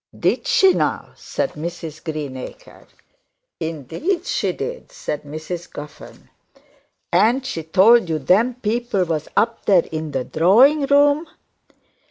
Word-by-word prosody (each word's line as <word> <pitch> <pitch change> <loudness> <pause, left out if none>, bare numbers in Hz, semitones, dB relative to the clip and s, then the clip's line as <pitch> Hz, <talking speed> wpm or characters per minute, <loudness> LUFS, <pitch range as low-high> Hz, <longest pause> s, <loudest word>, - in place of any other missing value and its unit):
'Did - - 0
she 390 -6 +5
now?' - - -2
said 275 - -4
Mrs 165 0 -7
Greenacre. 150 - -7 0.7
'Indeed 165 - -3
she - - -1
did,' 485 +1 -6
said 150 - -5
Mrs 155 +4 -7
Guffern. 145 0 -11 0.8
'And 250 +4 +3
she 170 -11 -4
told 190 +6 +4
you 160 - 0
them 205 - +2
people 235 -3 -1
was 160 -3 -3
up 225 +2 +1
there 185 -4 +4
in 155 -1 -4
the 135 -3 -2
drawing 250 - +4
room?' 290 +3 +3
185 Hz, 125 wpm, -20 LUFS, -, 0.8 s, she